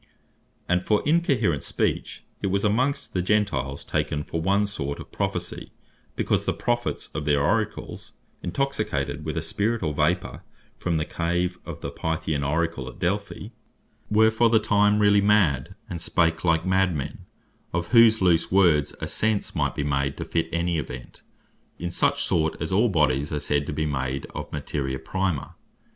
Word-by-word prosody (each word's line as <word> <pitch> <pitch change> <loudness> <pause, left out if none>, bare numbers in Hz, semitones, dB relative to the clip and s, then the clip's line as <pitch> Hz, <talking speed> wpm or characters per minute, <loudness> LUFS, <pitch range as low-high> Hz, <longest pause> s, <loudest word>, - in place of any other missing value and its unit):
And 90 0 +2
for 105 +1 +2
Incoherent 140 - +2
Speech, - - -2 0.2
it - - 0
was 100 +1 0
amongst 130 +7 0
the 90 - +1
Gentiles 85 -9 0
taken 75 0 -1
for 80 - -4
one 100 +4 +2
sort 70 -9 -4
of - - -10
Prophecy, - - -3 0.4
because - - 0
the - - +1
Prophets 120 0 -2
of 75 - -4
their 75 -2 +3
Oracles, 105 +9 -1 0.3
intoxicated 90 - -2
with 75 +2 -3
a 80 - -1
spirit, 105 +6 -1
or 75 -2 0
vapour 80 +5 0 0.4
from 85 -2 0
the 80 - -1
cave 90 +2 -1
of - - -7
the - - -4
Pythian 80 -3 -2
Oracle 80 -1 -1
at - - -12
Delphi, 100 +1 -2 0.6
were 110 +1 +5
for 115 +1 +3
the 115 - +5
time 105 -1 +3
really 105 -1 +5
mad, 95 -6 +2
and 85 -5 -5
spake 80 -1 +1
like 85 -1 +2
mad 95 -1 +2
men; 70 - -6 0.4
of 85 +2 -2
whose 115 -3 +6
loose 85 -3 +3
words 85 -6 +4
a - - -2
sense 110 -2 0
might - - 0
be 75 - -1
made 70 -1 -1
to - - -4
fit 85 -1 -1
any 85 -1 0
event, 65 -3 -8 0.6
in 85 +2 -4
such - - +1
sort, 80 -1 +1
as 80 - -3
all 110 +6 +3
bodies 75 -5 +1
are 75 - -1
said 75 -1 0
to - - -2
be 75 +1 -1
made 70 -2 -2
of - - -6
Materia 65 -2 -3
prima. 95 -3 -2
85 Hz, 170 wpm, -25 LUFS, 75-105 Hz, 0.6 s, whose